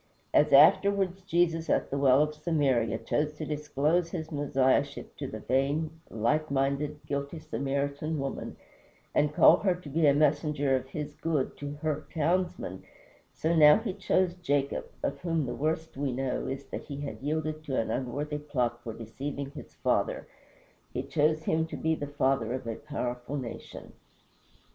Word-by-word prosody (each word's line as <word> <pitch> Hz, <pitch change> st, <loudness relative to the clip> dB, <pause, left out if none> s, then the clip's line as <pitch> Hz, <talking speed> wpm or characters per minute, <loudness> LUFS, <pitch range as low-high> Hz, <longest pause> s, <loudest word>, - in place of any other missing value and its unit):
As -, -, +4 dB
afterwards 195 Hz, -2 st, +5 dB
Jesus, 170 Hz, -2 st, +1 dB
at -, -, +1 dB
the 140 Hz, -, -1 dB
well 135 Hz, +1 st, +5 dB
of 150 Hz, 0 st, -2 dB
Samaria, 145 Hz, -7 st, +1 dB
chose 150 Hz, 0 st, -1 dB
to 155 Hz, -, -5 dB
disclose 150 Hz, +3 st, 0 dB
his 160 Hz, -2 st, -5 dB
Messiahship 140 Hz, -1 st, +1 dB
to 140 Hz, -, -4 dB
the 110 Hz, -3 st, -7 dB
vain, 140 Hz, +6 st, +1 dB, 0.2 s
light 150 Hz, +8 st, 0 dB
minded, 140 Hz, +2 st, 0 dB
guilty 140 Hz, +3 st, -3 dB
Samaritan 140 Hz, +3 st, -2 dB
woman, 135 Hz, -1 st, -4 dB, 0.6 s
and 150 Hz, 0 st, +3 dB
call -, -, +7 dB
her 190 Hz, -3 st, +1 dB
to 175 Hz, -4 st, -10 dB
be 155 Hz, +2 st, +3 dB
a 140 Hz, -, +6 dB
messenger 145 Hz, -2 st, +2 dB
of 130 Hz, 0 st, -3 dB
his 150 Hz, +1 st, -5 dB
good 150 Hz, -3 st, -1 dB
to 145 Hz, 0 st, -5 dB
her 155 Hz, -1 st, -1 dB
townsmen, 170 Hz, -, -1 dB, 0.5 s
so 165 Hz, +2 st, 0 dB
now 150 Hz, -2 st, +8 dB
he 220 Hz, -3 st, -3 dB
chose 185 Hz, -2 st, +1 dB
Jacob 145 Hz, -6 st, -1 dB, 0.2 s
of -, -, -1 dB
whom 165 Hz, -4 st, 0 dB
the 120 Hz, -, -3 dB
worst 160 Hz, +3 st, -2 dB
we 140 Hz, -1 st, -1 dB
know 130 Hz, 0 st, -2 dB
is 135 Hz, 0 st, -4 dB
that -, -, -6 dB
he 140 Hz, -1 st, -6 dB
had 140 Hz, -2 st, -6 dB
yielded 155 Hz, +1 st, -2 dB
to 135 Hz, -3 st, 0 dB
an 115 Hz, -, -1 dB
unworthy 145 Hz, +4 st, -2 dB
plot 125 Hz, -5 st, -1 dB
for 115 Hz, -2 st, -6 dB
deceiving 135 Hz, +5 st, -5 dB
his 150 Hz, -, -11 dB
father -, -, 0 dB, 0.7 s
he 125 Hz, -, -3 dB
chose 155 Hz, +3 st, +1 dB
him 160 Hz, +1 st, +1 dB
to -, -, -6 dB
be 160 Hz, 0 st, +1 dB
the 145 Hz, -2 st, -3 dB
father 135 Hz, -4 st, +1 dB
of 130 Hz, -1 st, -4 dB
a 115 Hz, -, -2 dB
powerful 125 Hz, -1 st, -4 dB
nation. 125 Hz, -4 st, -8 dB
145 Hz, 165 wpm, -29 LUFS, 135-155 Hz, 0.7 s, now